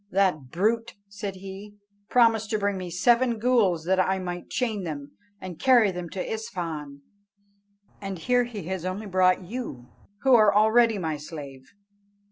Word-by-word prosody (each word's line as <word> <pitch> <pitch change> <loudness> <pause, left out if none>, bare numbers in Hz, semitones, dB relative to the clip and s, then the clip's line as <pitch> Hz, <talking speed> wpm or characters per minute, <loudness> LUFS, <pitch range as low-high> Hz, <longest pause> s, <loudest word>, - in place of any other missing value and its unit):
That 185 -10 +1
brute," 220 - 0
said 200 -1 -6
he, 195 +2 -10 0.3
"promised 225 -3 +3
to 220 - 0
bring 200 -1 0
me 185 -1 -5
seven 235 +7 +2
ghools, 210 -9 +2
that 190 +1 +2
I 190 +1 +2
might 175 -1 -6
chain 220 -6 -2
them, 145 -4 -6 0.3
and 180 -3 -8
carry 240 -6 +5
them 180 -1 -6
to 185 - -5
Isfahan, 160 -9 -6 1.0
and 195 -2 -5
here 245 +7 +1
he 220 -5 -7
has 185 +1 -4
only 185 +4 -4
brought 185 -1 +2
you, 180 - -7 0.3
who 265 -1 +5
are 215 -3 +6
already 220 +1 +4
my 160 -5 -2
slave." 145 -3 -9
190 Hz, 155 wpm, -26 LUFS, 175-220 Hz, 1.0 s, are